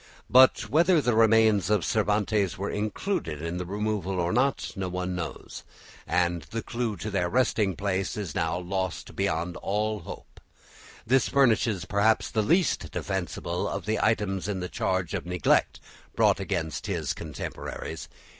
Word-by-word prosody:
But 130 +1 +6
whether 170 +3 +4
the 125 -4 +1
remains 110 -3 +4
of 105 -5 +2
Cervantes 105 -2 +1
were 100 +2 -3
included 105 - -2
in 85 +2 -4
the 90 -1 -4
removal 100 -2 -2
or 85 0 0
not 130 +3 +1
no 95 -2 -3
one 90 0 -3
knows, 85 -2 -6 0.5
and 85 -1 +1
the 115 0 -4
clue 115 -4 -3
to 105 +5 -5
their 90 -3 0
resting 110 -5 +1
place 95 0 -2
is 100 -8 -4
now 80 +1 0
lost 95 +1 -4
beyond 85 +2 -1
all 105 +1 -1
hope. - - -11 0.7
This 130 +2 +3
furnishes 115 -7 +2
perhaps 105 +2 +2
the 110 - +1
least 170 - +1
defensible 90 -2 -3
of 100 - -4
the 110 0 0
items 105 -4 0
in 100 -2 -2
the 90 0 -4
charge 95 -1 -1
of 90 -3 -3
neglect 90 -2 +2 0.4
brought - - +3
against 85 -6 -3
his - - -1
contemporaries. 75 -5 -6
100 Hz, 155 wpm, -27 LUFS, 90-110 Hz, 0.7 s, But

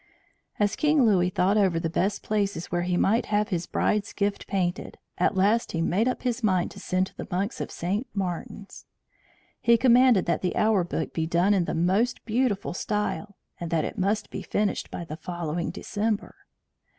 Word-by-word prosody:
As 205 0 +2
King 300 -4 +3
Louis 185 -5 +3
thought 195 +2 +2
over 190 -5 +3
the 165 - -1
best 190 +5 -1
places 200 -5 -1
where 175 0 0
he 175 0 0
might 225 +7 +2
have 210 0 +1
his 175 -4 -2
bride's 210 -1 0
gift 200 -1 -2
painted, 180 -2 -2 0.2
at - - +2
last 205 +5 +2
he 165 - -1
made 200 +8 +1
up 255 - -2
his 250 -1 -1
mind 185 -5 +1
to - - -11
send 185 +1 0
to - - -15
the - - -6
monks 195 +6 -2
of - - -4
St. 200 +8 -2
Martin's. 195 +1 -5 0.7
He 235 0 +4
commanded 245 -3 +5
that 170 -2 0
the 180 - -1
hour 215 -4 +3
book 165 -2 -3
be 160 -1 -1
done 175 +5 +3
in 185 -4 +2
the - - -3
most 190 +9 +1
beautiful 225 -5 0
style, 210 0 -3 0.2
and 170 - -4
that 160 -2 +1
it - - -5
must 205 +3 0
be - - -5
finished 205 -1 -1
by 170 - -6
the 155 -1 -7
following 170 0 -3
December. 210 +2 -2
195 Hz, 190 wpm, -26 LUFS, 175-215 Hz, 0.7 s, commanded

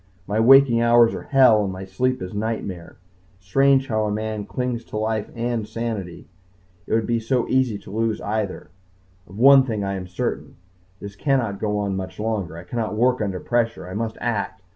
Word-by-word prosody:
My 105 +3 -1
waking 125 0 +6
hours 120 0 +5
are - - -5
hell 130 -6 +5
and 95 - -2
my 95 +1 -7
sleep 125 +4 -1
is 90 - -7
nightmare. 105 -5 -4 0.4
Strange 135 +7 +2
how 110 -1 0
a 105 - -1
man 110 -1 -3
clings 125 -2 -3
to - - -6
life 110 -1 -2
and 115 -2 -2
sanity. 110 -6 -5 0.6
It - - +1
would 110 -1 +1
be 115 +1 0
so 120 +2 -1
easy 130 -5 +1
to 100 - -13
lose 110 +1 -1
either. 105 -4 -4 0.6
Of 95 - -12
one 135 +3 +8
thing 110 -5 -3
I 100 0 -2
am 95 -1 -5
certain 90 - -4 0.4
this 100 -1 -9
cannot 120 -6 0
go 105 -1 -1
on 100 -2 -1
much 95 +1 -6
longer. 105 -6 -3
I 85 - -9
cannot 110 +3 -3
work 125 +2 +2
under 95 -3 -2
pressure. 115 -4 -1
I 90 - -7
must 110 +2 -3
act. 105 -4 -3
110 Hz, 190 wpm, -22 LUFS, 100-120 Hz, 0.6 s, one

